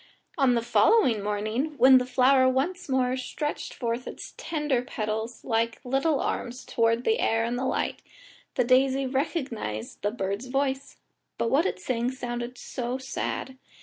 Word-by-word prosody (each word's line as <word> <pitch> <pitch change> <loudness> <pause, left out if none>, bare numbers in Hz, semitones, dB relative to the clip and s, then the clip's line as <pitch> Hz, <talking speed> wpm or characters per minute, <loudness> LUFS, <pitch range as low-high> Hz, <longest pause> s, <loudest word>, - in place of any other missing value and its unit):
On 270 -5 +3
the 235 - 0
following 240 - +4
morning, 215 +9 -2
when 260 0 +8
the 250 - -3
flower 260 +1 +4
once 285 +7 -1
more 255 -1 +2
stretched 280 +3 -4
forth 235 0 -3
its - - -8
tender 295 -6 -1
petals, 220 -1 -4
like 230 -1 0
little 270 +4 +1
arms, 245 +1 -3
towards 230 +1 +1
the 450 - +2
air 225 0 +2
and 235 +1 -2
light, 260 +1 -1 0.5
the 250 - +3
daisy 265 +2 +3
recognised 260 - -3
the 205 - +1
bird's 205 +2 -3
voice, 270 0 -2 0.4
but 230 - 0
what 315 +7 +4
it - - -3
sang 235 +4 -1
sounded 245 -1 -5
so 245 0 -4
sad. 265 0 -4
255 Hz, 150 wpm, -27 LUFS, 230-270 Hz, 0.5 s, when